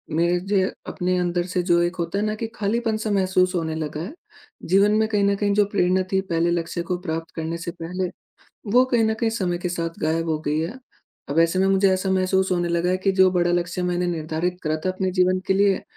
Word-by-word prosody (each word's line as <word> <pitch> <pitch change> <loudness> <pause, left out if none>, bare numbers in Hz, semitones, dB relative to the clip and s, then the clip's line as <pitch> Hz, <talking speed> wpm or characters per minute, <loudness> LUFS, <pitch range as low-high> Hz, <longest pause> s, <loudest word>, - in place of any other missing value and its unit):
मेरे 170 +2 +2
जे 195 -2 +2 0.2
अपने 180 0 -1
अंदर 175 0 0
से 180 0 -1
जो 175 -1 +3
एक 175 +1 0
होता 170 +3 -2
है 210 - 0
ना 215 0 -1
कि 225 +1 -4
खालीपन 220 +1 0
सा 215 -1 -3
महसूस 185 -1 +2
होने 160 -2 -1
लगा 155 -1 -4
है, 195 - -6 0.5
जीवन 195 +4 +4
में 220 +1 +2
कहीं 205 -2 +1
न 200 0 +3
कहीं 205 0 +1
जो 205 0 +4
प्रेरणा 185 -1 +2
थी, 190 - +3
पहले 170 -2 0
लक्ष्य 170 0 -2
को 180 +1 -2
प्राप्त 165 -2 -4
करने 165 +1 -3
से 170 +1 -5
पहले, 180 +2 -3 0.6
वो 250 +2 +6
कहीं 240 -3 +2
न 220 0 +1
कहीं 230 - +2
समय 185 -6 -1
के 180 - -3
साथ 165 -1 -4
गायब 165 +1 0
हो 155 -1 0
गई 150 +1 +1
है। 175 +11 -4 0.5
अब 145 - 0
ऐसे 165 +2 +2
में 190 - +3
मुझे 195 0 +4
ऐसा 185 +1 -1
महसूस 190 0 +1
होने 175 -1 0
लगा 170 +1 +1
है 185 - +2
कि 195 +1 +1
जो 190 -1 +5
बड़ा 175 -1 +2
लक्ष्य 175 +1 -1
मैंने 180 0 0
निर्धारित 165 +1 -2
करा 155 -1 0
था - - +2
अपने 185 0 -2
जीवन 185 0 +2
के 190 - +3
लिए, 195 0 +2
180 Hz, 240 wpm, -23 LUFS, 170-195 Hz, 0.6 s, वो